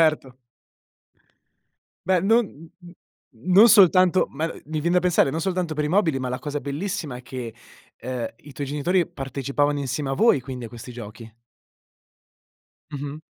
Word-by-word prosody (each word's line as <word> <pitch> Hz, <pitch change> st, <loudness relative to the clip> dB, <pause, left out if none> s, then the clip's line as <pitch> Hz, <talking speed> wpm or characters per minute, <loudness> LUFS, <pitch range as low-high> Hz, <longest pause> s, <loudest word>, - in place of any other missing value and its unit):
Certo! 155 Hz, -5 st, +1 dB, 1.7 s
Beh, 185 Hz, -2 st, +3 dB
non 225 Hz, +4 st, +3 dB
n 165 Hz, -4 st, -14 dB, 0.2 s
n 175 Hz, -, -13 dB, 0.4 s
non 185 Hz, -, +5 dB
soltanto 185 Hz, -3 st, +6 dB
ma, 155 Hz, +3 st, -3 dB
uhm, 165 Hz, -, -5 dB
mi 155 Hz, 0 st, -3 dB
vien 170 Hz, +3 st, 0 dB
da 180 Hz, -, +5 dB
pensare, 175 Hz, -6 st, +2 dB
non 160 Hz, +4 st, -3 dB
soltanto 180 Hz, -2 st, -1 dB
per 150 Hz, 0 st, -1 dB
i -, -, -1 dB
mobili, 165 Hz, -6 st, +2 dB
ma 130 Hz, -1 st, -3 dB
la 125 Hz, -, -3 dB
cosa 145 Hz, -1 st, -4 dB
bellissima 150 Hz, -1 st, -4 dB
è 125 Hz, -, -11 dB
che, 125 Hz, -3 st, -7 dB, 0.5 s
uhm, 125 Hz, -1 st, -3 dB
i 145 Hz, -, -13 dB
tuoi 140 Hz, +1 st, -5 dB
genitori 165 Hz, +5 st, 0 dB
partecipavano 140 Hz, +2 st, -2 dB
insieme 135 Hz, +1 st, -3 dB
a -, -, 0 dB
voi, 210 Hz, -, +4 dB
quindi, 125 Hz, -1 st, -7 dB
a -, -, -10 dB
questi 120 Hz, +2 st, -10 dB
giochi. 115 Hz, -1 st, -10 dB, 1.6 s
Mh-mh. 145 Hz, +1 st, -6 dB
145 Hz, 165 wpm, -24 LUFS, 130-175 Hz, 1.7 s, soltanto